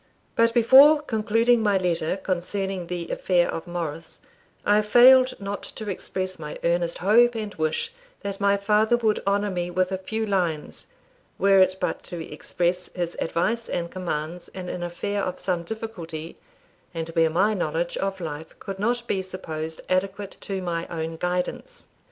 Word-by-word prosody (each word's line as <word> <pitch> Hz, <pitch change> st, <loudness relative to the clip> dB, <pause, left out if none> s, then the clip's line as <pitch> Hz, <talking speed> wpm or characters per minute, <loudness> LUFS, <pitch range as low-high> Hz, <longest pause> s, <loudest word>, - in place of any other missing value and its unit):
But 230 Hz, 0 st, +4 dB
before 270 Hz, +6 st, +8 dB
concluding 230 Hz, -2 st, +2 dB
my 205 Hz, -2 st, +3 dB
letter 175 Hz, -1 st, 0 dB
concerning 190 Hz, 0 st, -3 dB
the 175 Hz, -1 st, -4 dB
affair 175 Hz, -2 st, +2 dB
of 165 Hz, -, -5 dB
Morris, 165 Hz, -2 st, -5 dB, 0.5 s
I 210 Hz, +1 st, +5 dB
failed 255 Hz, +4 st, +6 dB
not 200 Hz, 0 st, -4 dB
to 215 Hz, -2 st, -6 dB
express 185 Hz, 0 st, -4 dB
my 150 Hz, -1 st, -6 dB
earnest 170 Hz, 0 st, +1 dB
hope 235 Hz, +5 st, +4 dB
and 215 Hz, -2 st, -4 dB
wish 155 Hz, -, -2 dB, 0.3 s
that 200 Hz, 0 st, -5 dB
my 200 Hz, 0 st, +4 dB
father 215 Hz, +3 st, +3 dB
would 220 Hz, -3 st, +1 dB
honour 200 Hz, +1 st, +1 dB
me 175 Hz, -1 st, -2 dB
with 185 Hz, +1 st, 0 dB
a 190 Hz, -, -2 dB
few 220 Hz, +4 st, -3 dB
lines, 175 Hz, -7 st, -2 dB, 0.5 s
were 195 Hz, 0 st, +5 dB
it 185 Hz, 0 st, +4 dB
but -, -, -2 dB
to 175 Hz, -, -6 dB
express 175 Hz, +3 st, -2 dB
his 175 Hz, -1 st, -2 dB
advice 225 Hz, +8 st, -1 dB
and 170 Hz, -1 st, -3 dB
commands 175 Hz, -1 st, -4 dB
in 180 Hz, -1 st, -5 dB
an 180 Hz, -, -4 dB
affair 200 Hz, +4 st, -2 dB
of 185 Hz, -1 st, -3 dB
some 180 Hz, -2 st, -1 dB
difficulty, 170 Hz, -6 st, -6 dB, 0.6 s
and 165 Hz, 0 st, -3 dB
where 165 Hz, -1 st, +3 dB
my 195 Hz, +7 st, +2 dB
knowledge 170 Hz, -2 st, -1 dB
of 195 Hz, 0 st, -2 dB
life 160 Hz, -2 st, -7 dB
could 195 Hz, -1 st, -7 dB
not 240 Hz, +3 st, 0 dB
be 195 Hz, -, 0 dB
supposed 160 Hz, -4 st, -6 dB
adequate 195 Hz, +2 st, -1 dB
to 195 Hz, -2 st, -4 dB
my 170 Hz, -1 st, -2 dB
own 165 Hz, -1 st, -4 dB
guidance. 180 Hz, -, -3 dB
185 Hz, 165 wpm, -25 LUFS, 170-210 Hz, 0.6 s, before